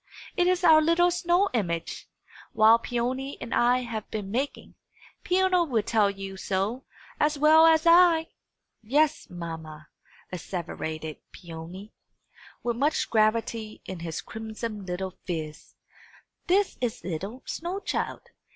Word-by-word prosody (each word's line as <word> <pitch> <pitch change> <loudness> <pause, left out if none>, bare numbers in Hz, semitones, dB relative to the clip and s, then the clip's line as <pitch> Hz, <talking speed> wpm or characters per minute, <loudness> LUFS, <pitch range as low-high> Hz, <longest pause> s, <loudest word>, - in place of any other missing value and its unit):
It 355 -1 +2
is 365 0 +1
our 320 -2 +7
little 335 +3 +3
snow 350 +3 +2
image, 170 -8 -3 0.4
which 225 +2 +6
Peony 255 +4 -2
and 235 - -6
I 250 +1 +3
have 225 -3 -5
been 205 -3 -5
making. 270 +6 -3 0.5
Peony 365 -1 +3
will 230 -6 +1
tell 210 -2 +2
you 195 -1 -7
so, 200 +7 -2 0.3
as 300 0 +2
well 315 +2 +7
as 320 0 +4
I." 335 -1 +6 0.5
"Yes, 290 +7 +1
mamma," 160 -3 -8 0.4
asseverated 160 -3 -5
Peony, 175 +4 -10 0.7
with 240 -1 -1
much 290 +4 0
gravity 220 0 0
in 190 -2 -6
his 165 -1 -5
crimson 220 -2 -6
little 185 +1 -4
phiz, 155 -4 -5 0.7
"this 390 +2 +2
is 240 -3 -2
'ittle 195 +9 -5
snow 350 +4 -4
child. - - -3
230 Hz, 125 wpm, -27 LUFS, 190-310 Hz, 0.7 s, our